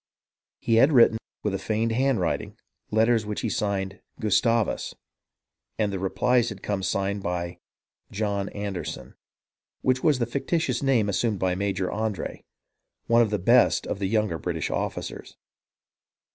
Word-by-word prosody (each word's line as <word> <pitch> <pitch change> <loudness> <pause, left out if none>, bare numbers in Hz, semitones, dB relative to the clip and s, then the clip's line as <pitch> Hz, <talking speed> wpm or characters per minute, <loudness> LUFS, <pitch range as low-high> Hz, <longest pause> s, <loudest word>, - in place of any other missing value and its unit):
He 115 - +1
had 135 +6 +6
written, 115 -4 +5 0.2
with 105 - 0
a 95 - -1
feigned 110 +1 0
handwriting, 120 -7 0 0.3
letters 110 +1 +3
which 105 0 -4
he 115 - -1
signed 95 -2 -2 0.2
"Gustavus"; 110 +2 +1 0.8
and 105 -2 0
the 95 - -2
replies 120 +5 +2
had 100 -3 -9
come 100 -2 -1
signed 100 +2 -1
by 85 -1 -3 0.5
"John 100 -1 -1
Anderson," 100 -3 -5 0.7
which 130 0 +1
was 150 -4 +4
the 120 - 0
fictitious 135 +1 -1
name 130 -6 +2
assumed 105 +2 0
by 95 -1 0
Major 95 -1 -1
Andre, 110 -5 -3 0.6
one 115 0 +4
of 115 - +3
the 105 - 0
best 115 +7 +4
of 100 - -3
the 100 - 0
younger 105 -5 0
British - - -3
officers. - - -4
105 Hz, 145 wpm, -26 LUFS, 95-115 Hz, 0.8 s, had